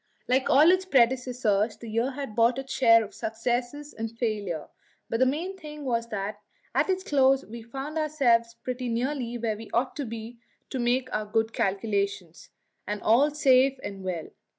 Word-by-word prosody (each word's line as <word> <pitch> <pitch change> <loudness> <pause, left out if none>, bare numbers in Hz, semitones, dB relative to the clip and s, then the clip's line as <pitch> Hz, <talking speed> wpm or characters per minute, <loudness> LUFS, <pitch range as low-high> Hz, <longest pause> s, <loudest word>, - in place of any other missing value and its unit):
Like 260 +1 +2
all 305 +5 +7
its 370 0 +2
predecessors, 245 - +2
the 235 - -10
year 230 +4 0
had 270 -6 -6
brought 235 +2 +3
its 270 0 -5
share 230 -3 +6
of 210 - -10
success 245 +6 -3
and 225 0 -4
failure; 210 -9 -3 0.4
but 230 - 0
the 260 - +5
main 335 +8 -2
thing 300 -5 -9
was 235 -2 -1
that 205 -1 -4 0.3
at - - +2
its 375 0 0
close 270 -3 +3
we 235 +2 -9
found 270 +7 -5
ourselves 240 -7 +2
pretty 250 +1 -4
nearly 240 0 -2
where 225 -2 -1
we 225 0 -10
ought 250 +2 0
to 285 - -2
be 230 +1 -7 0.3
to 260 - -3
make 245 +2 +1
good 215 0 -1 0.2
our - - -28
calculations 200 -4 -2 0.4
and 210 0 -2
all 250 +7 +5
safe 270 -2 +4
and 195 -1 -6
well. 175 -4 -4
240 Hz, 175 wpm, -27 LUFS, 220-270 Hz, 0.4 s, all